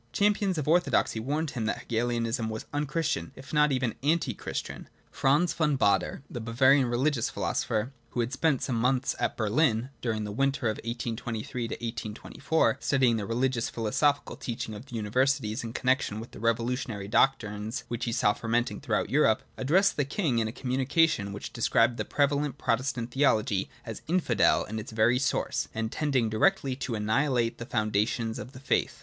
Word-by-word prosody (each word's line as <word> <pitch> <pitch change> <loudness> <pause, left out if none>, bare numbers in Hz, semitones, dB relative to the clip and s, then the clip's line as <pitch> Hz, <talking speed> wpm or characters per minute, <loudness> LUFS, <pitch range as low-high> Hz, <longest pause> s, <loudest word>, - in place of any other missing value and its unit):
Champions 205 -3 +2
of 150 - -2
orthodoxy 170 -8 +2
warned 145 +6 -2
him 115 -5 -3
that - - 0
Hegelianism 115 0 -1
was 110 0 -5
unchristian, 145 - -1
if 135 +3 -12
not 150 -1 +4
even 130 -4 0
anti 150 -3 +1
christian. - - -6 0.2
Franz 150 +6 +2
von 150 -4 +1
Baader, 100 +4 +1
the 120 - -6
Bavarian 130 +4 +4
religious 125 +1 +1
philosopher 110 +4 -1 0.2
(who - - -5
had 120 +3 -2
spent 140 -1 +1
some 125 -4 -1
months 125 +3 +1
at - - -1
Berhn 115 +2 +1
during 110 -3 -1
the 105 - -4
winter 135 +3 0
of - - -7
1823 115 -1 -4 0.3
4, 160 - +2
studying 130 -4 +2
the 100 -2 -4
rehgious 120 +1 0
and - - -10
philosophical 140 +6 +1
teaching 115 -2 -5
of 105 +6 -9
the 125 - -8
universities 115 +1 0
in 115 - -5
connection 130 -4 0
with 115 - -9
the - - -11
revolutionary 115 -2 -1
doctrines 110 -1 +1
which 120 -1 -3
he 120 - -1
saw 115 -3 +3
fermenting 120 +2 -1
throughout - - -1
Europe), 130 -6 +3
addressed 175 +10 +2
the 145 - +2
king 140 - 0
in 110 - 0
a - - -4
communication 130 -3 +1
which 100 - -7
described 115 0 +2
the - - -2
prevalent 145 0 0
Protestant 120 -1 -1
theology 110 -8 +2 0.2
as 115 -3 -6
infidel 180 +2 +3
in 110 +1 -5
its 110 - -8
very 110 +3 +3
source, 135 - 0
and 110 0 -2
as - - -9
tending 135 -6 +2
directly 110 +4 +2
to 125 -3 -3
annihilate 115 +2 +1
the 120 - -6
foun 110 -3 -1
dations 110 +2 0
of 125 +6 -8
the 130 - -10
faith. 140 - 0
120 Hz, 175 wpm, -28 LUFS, 110-140 Hz, 0.3 s, not